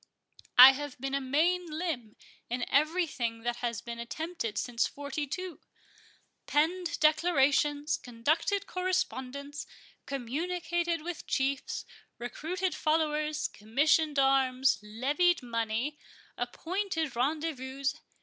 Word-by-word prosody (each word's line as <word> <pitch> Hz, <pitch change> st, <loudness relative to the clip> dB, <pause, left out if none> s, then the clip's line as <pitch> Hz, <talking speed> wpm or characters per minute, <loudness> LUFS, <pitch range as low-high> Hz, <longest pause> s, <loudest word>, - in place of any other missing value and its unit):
I 255 Hz, +2 st, +13 dB
have 285 Hz, -1 st, -6 dB
been 270 Hz, +1 st, -3 dB
a 275 Hz, -, +1 dB
main 335 Hz, +7 st, +1 dB
limb 305 Hz, -9 st, -4 dB, 0.3 s
in 245 Hz, +1 st, -1 dB
every 315 Hz, +6 st, +3 dB
thing 235 Hz, -6 st, -3 dB
that 240 Hz, 0 st, -1 dB
has 235 Hz, -3 st, -2 dB
been 235 Hz, 0 st, -7 dB
attempted 275 Hz, -1 st, -4 dB
since 240 Hz, -2 st, 0 dB
forty 285 Hz, +1 st, -4 dB
two—penned 345 Hz, 0 st, -4 dB
declarations, 295 Hz, -2 st, +3 dB
conducted 310 Hz, -, 0 dB
correspondence, 290 Hz, -6 st, -2 dB, 0.4 s
communicated 335 Hz, +5 st, -2 dB
with 345 Hz, -1 st, -6 dB
chiefs, 270 Hz, 0 st, -1 dB, 0.3 s
recruited 355 Hz, +10 st, -3 dB
followers, 305 Hz, -1 st, 0 dB
commissioned 290 Hz, +8 st, +1 dB
arms, 270 Hz, -1 st, +3 dB
levied 280 Hz, +10 st, +1 dB
money, 230 Hz, +4 st, -2 dB, 0.4 s
appointed 335 Hz, -6 st, -2 dB
rendezvouses. 275 Hz, 0 st, -1 dB
290 Hz, 100 wpm, -30 LUFS, 255-330 Hz, 0.4 s, I